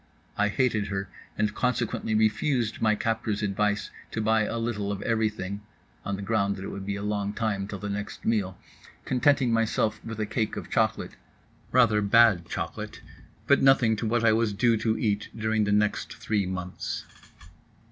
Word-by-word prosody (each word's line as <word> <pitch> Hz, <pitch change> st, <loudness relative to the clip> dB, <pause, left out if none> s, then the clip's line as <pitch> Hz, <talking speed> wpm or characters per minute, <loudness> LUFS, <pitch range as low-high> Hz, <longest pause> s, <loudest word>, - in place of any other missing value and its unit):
I 105 Hz, -, +2 dB
hated 110 Hz, -2 st, +1 dB
her 95 Hz, -1 st, -3 dB, 0.3 s
and 105 Hz, -1 st, +1 dB
consequently 120 Hz, -2 st, -1 dB
refused 110 Hz, +2 st, +1 dB
my 110 Hz, -1 st, +3 dB
captor's 110 Hz, -1 st, -1 dB
advice 105 Hz, +1 st, 0 dB, 0.2 s
to -, -, -4 dB
buy 110 Hz, 0 st, +2 dB
a 115 Hz, -, -3 dB
little 110 Hz, -3 st, -2 dB
of 100 Hz, -, -4 dB
everything 110 Hz, -3 st, -1 dB, 0.4 s
(on 100 Hz, -, -2 dB
the 100 Hz, -, -6 dB
ground 100 Hz, -1 st, +1 dB
that 95 Hz, -, -8 dB
it -, -, -5 dB
would 100 Hz, 0 st, -7 dB
be 100 Hz, -, -1 dB
a 100 Hz, -, -5 dB
long 105 Hz, -1 st, -1 dB
time 105 Hz, -3 st, -1 dB
till 105 Hz, -, -5 dB
the 105 Hz, -, -5 dB
next 100 Hz, 0 st, -5 dB
meal), 100 Hz, -5 st, 0 dB, 0.5 s
contenting 130 Hz, -1 st, +3 dB
myself 110 Hz, -1 st, 0 dB
with 115 Hz, -1 st, -6 dB
a 110 Hz, -, 0 dB
cake 110 Hz, 0 st, -2 dB
of -, -, -7 dB
chocolate—rather 105 Hz, 0 st, 0 dB
bad 105 Hz, -4 st, +5 dB
chocolate, -, -, -5 dB, 0.5 s
but -, -, +4 dB
nothing 135 Hz, -4 st, +5 dB
to 110 Hz, -, -2 dB
what 115 Hz, +1 st, +1 dB
I 110 Hz, -, +6 dB
was 110 Hz, -1 st, +1 dB
due 115 Hz, +3 st, +3 dB
to 110 Hz, 0 st, 0 dB
eat 105 Hz, -2 st, -1 dB
during 110 Hz, -1 st, +1 dB
the 105 Hz, -, 0 dB
next 105 Hz, 0 st, +1 dB
three 105 Hz, -4 st, -1 dB
months. 90 Hz, -1 st, -4 dB
105 Hz, 175 wpm, -27 LUFS, 100-115 Hz, 0.5 s, I